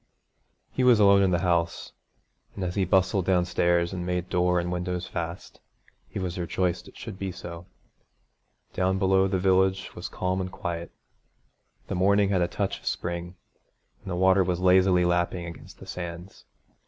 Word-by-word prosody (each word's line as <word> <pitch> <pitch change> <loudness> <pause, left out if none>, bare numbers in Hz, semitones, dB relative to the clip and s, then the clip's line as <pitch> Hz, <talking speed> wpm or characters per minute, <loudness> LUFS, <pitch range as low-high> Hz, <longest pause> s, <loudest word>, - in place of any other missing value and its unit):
He 130 - -1
was 125 -3 +6
alone 100 -1 +6
in 95 - +3
the 85 -1 +1
house, 85 -1 0 0.6
and 95 - -4
as 90 -1 -2
he 95 -1 +1
bustled 95 +1 +2
downstairs 90 -1 +2
and 90 -2 -4
made 90 0 -2
door 90 0 +2
and 85 0 -3
windows 90 0 -3
fast, 85 0 -6 0.5
he 105 - -7
was 90 -1 -3
rejoiced 90 +1 -1
it - - -15
should 95 - -8
be 95 -1 -3
so. 85 -1 -9 1.1
Down 95 +1 +1
below 95 0 +3
the 95 0 0
village 95 0 +2
was - - -7
calm 95 +1 -2
and 95 0 -4
quiet. 85 -4 -5 0.9
The - - -5
morning 100 +2 +3
had 95 -3 +1
a 85 - +2
touch - - -3
of - - -14
spring, 85 0 -3 0.7
and - - -9
the 90 - -2
water 95 +1 +4
was 90 -1 -1
lazily 90 -1 +4
lapping 85 0 0
against 85 -1 -10
the - - -12
sands. 85 +1 -8
90 Hz, 170 wpm, -26 LUFS, 85-95 Hz, 1.1 s, was